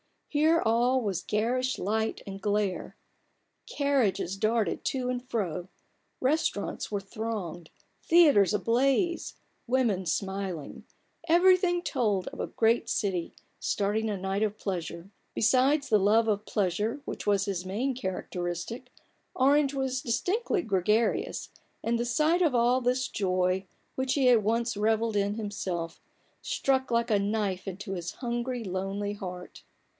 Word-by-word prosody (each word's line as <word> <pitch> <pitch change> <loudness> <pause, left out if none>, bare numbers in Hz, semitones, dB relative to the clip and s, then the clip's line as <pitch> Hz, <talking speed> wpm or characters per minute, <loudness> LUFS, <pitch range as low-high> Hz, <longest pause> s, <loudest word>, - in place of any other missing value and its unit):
Here 315 +2 +3
all 240 +3 +3
was 200 -6 -2
garish 250 +5 0
light 220 +3 -1
and 195 0 -7
glare; 205 -2 -1 0.7
carriages 260 - +1
darted 220 +1 0
to 255 -2 -1
and 250 -1 -2
fro, 180 -5 -2 0.5
restaurants 270 -6 0
were 205 -2 -2
thronged, 195 -6 -5 0.4
theatres 290 - +6
ablaze, 265 - +1 0.3
women 235 -7 +1
smiling: 190 -3 -3 0.4
everything 350 +1 +4
told 210 - 0
of - - -12
a - - -2
great 230 +1 +1
city 185 -5 -1 0.2
starting 215 +2 0
a 210 - -1
night 190 +2 -2
of 215 -1 0
pleasure. 175 -2 -5 0.2
Besides 265 +5 +3
the 215 -3 +5
love 215 +3 +4
of 210 -1 0
pleasure 210 +7 -1
which - - -6
was 200 -1 +3
his 190 -3 -3
main 230 +9 -1
characteristic, 190 +1 -4 0.5
Orange 280 +2 +3
was 265 -1 -1
distinctly 365 - 0
gregarious; 210 +3 0 0.3
and 235 +1 0
the 240 - 0
sight 305 +9 +2
of 310 -7 +3
all 240 +2 +4
this 250 +1 0
joy, 185 -1 0 0.3
which 260 0 0
he 270 -3 +3
had 235 -4 +5
once 230 +1 +1
revelled 220 +1 +1
in 200 +1 +1
himself, 190 -6 -4 0.4
struck 265 -1 0
like 235 -1 +1
a 205 - +4
knife 200 -2 -1
into 195 +2 -6
his 175 -2 -4
hungry, 240 0 -3
lonely 195 +1 -3
heart. 180 -3 -8
220 Hz, 135 wpm, -28 LUFS, 195-255 Hz, 0.7 s, theatres